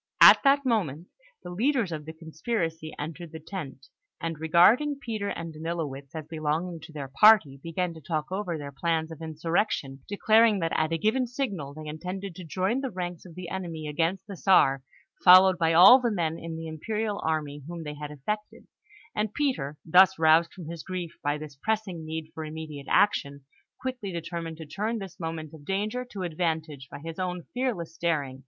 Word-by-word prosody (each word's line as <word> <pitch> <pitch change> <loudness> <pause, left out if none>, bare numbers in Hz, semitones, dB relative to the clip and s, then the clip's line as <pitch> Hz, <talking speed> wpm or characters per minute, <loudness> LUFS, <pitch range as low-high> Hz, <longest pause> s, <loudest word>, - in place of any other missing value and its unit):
At - - +10
that 280 0 +4
moment, 180 - -1 0.3
the 175 - -7
leaders 230 0 +1
of 155 -2 -5
the 160 - -7
conspiracy 160 0 -3
entered 165 +2 -6
the 160 - -8
tent, 155 -6 -7 0.3
and, 165 -2 -4
regarding 205 - +4
Peter 220 -6 -3
and 165 -1 -5
Danilowitz 155 -4 -5
as 155 -2 -5
belonging 160 +2 -2
to 160 +1 -12
their 145 -3 -6
party, 195 -11 +6
began 170 +2 -2
to 160 - -12
talk 155 +2 -3
over 185 -4 -2
their 145 -1 -7
plans 160 +2 -1
of 160 - -9
insurrection, 160 -3 -2
declaring 220 +1 +4
that 165 -1 -1
at 155 - +1
a 165 - +1
given 220 +9 +1
signal 200 - -4
they 155 0 -8
intended 180 +5 -5
to 180 - -9
join 190 - -1
the 270 - -2
ranks 180 -4 -5
of 170 -3 -12
the 180 -2 -7
enemy 170 -5 -5
against 170 +5 -1
the 200 - -8
Czar, 135 -8 +4 0.4
followed 185 0 +8
by 165 -1 +3
all 215 +10 +9
the 240 - +1
men 165 -6 -1
in 165 -1 -6
the 165 0 -6
imperial 210 +6 -3
army 150 -2 -2
whom 170 -1 -6
they 150 -1 -5
had 150 0 -7
affected; 210 +10 -5 0.5
and 210 0 -1
Peter, 200 - -1
thus 185 +3 +6
roused 160 +1 +5
from 180 - -10
his 165 0 -6
grief 180 -2 -5
by 145 +1 0
this 150 -2 -9
pressing 210 -6 -2
need 160 0 -6
for 160 - -6
immediate 155 -2 -7
action, 140 -9 +2 0.3
quickly 255 -6 -4
determined 165 -1 -5
to 160 - -8
turn 210 +9 -2
this 195 -1 -8
moment 160 -2 -5
of 155 -2 -12
danger 210 +8 -2
to 205 -6 -7
advantage 160 -5 -2
by - - -8
his 165 +4 -8
own 180 -1 -3
fearless 225 -11 -2
daring. 145 -6 -1
165 Hz, 190 wpm, -27 LUFS, 155-195 Hz, 0.5 s, At